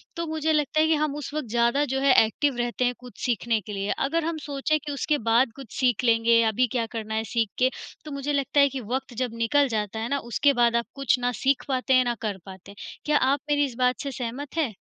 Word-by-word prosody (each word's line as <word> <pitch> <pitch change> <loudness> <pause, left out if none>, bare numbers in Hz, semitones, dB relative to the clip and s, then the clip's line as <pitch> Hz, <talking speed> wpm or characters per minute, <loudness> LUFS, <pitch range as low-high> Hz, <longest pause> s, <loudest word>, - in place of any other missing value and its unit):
तो 335 - -3
मुझे 315 0 0
लगता 300 +1 +1
है 315 - +4
कि 320 - +3
हम 300 -1 -1
उस 295 -1 -6
वक़्त 305 -5 -3
ज़्यादा 235 +5 +2
जो 270 - 0
है 275 -2 +5
एक्टिव 265 +5 -1
रहते 240 +1 -1
हैं 245 - +1
कुछ 250 -1 -14
सीखने 230 -2 0
के 205 +2 -8
लिए। 195 +1 -3
अगर 320 +4 0
हम 330 -1 -2
सोचें 290 +2 0
कि 290 - -4
उसके 295 +2 0
बाद 235 +1 +4
कुछ 270 -6 -11
सीख 250 -3 +2
लेंगे, 230 0 +4
अभी 225 +3 +2
क्या 230 0 -1
करना 220 0 -4
है 220 - 0
सीख 225 -3 +1
के, 255 +1 +4 0.4
तो 300 - -7
मुझे 280 +1 -3
लगता 280 0 +1
है 280 0 +6
कि 265 -1 -5
वक़्त 260 -1 -3
जब 245 - -4
निकल 285 +4 +3
जाता 210 +1 -3
है 225 - -3
ना, 280 - +1
उसके 255 +5 +1
बाद 235 -1 +3
आप 235 0 +1
कुछ 265 -2 +1
ना 245 0 0
सीख 270 0 +2
पाते 265 0 0
हैं, 255 0 +5
ना 240 - 0
कर 210 -4 -2
पाते 190 0 -11
हैं। - - -15 0.3
क्या 300 -1 +3
आप 275 +2 +2
मेरी 290 0 +3
इस 260 -4 -7
बात 250 0 +2
से 280 - -4
सहमत 265 +4 -6
हैं? 280 -10 0
255 Hz, 260 wpm, -25 LUFS, 230-285 Hz, 0.4 s, है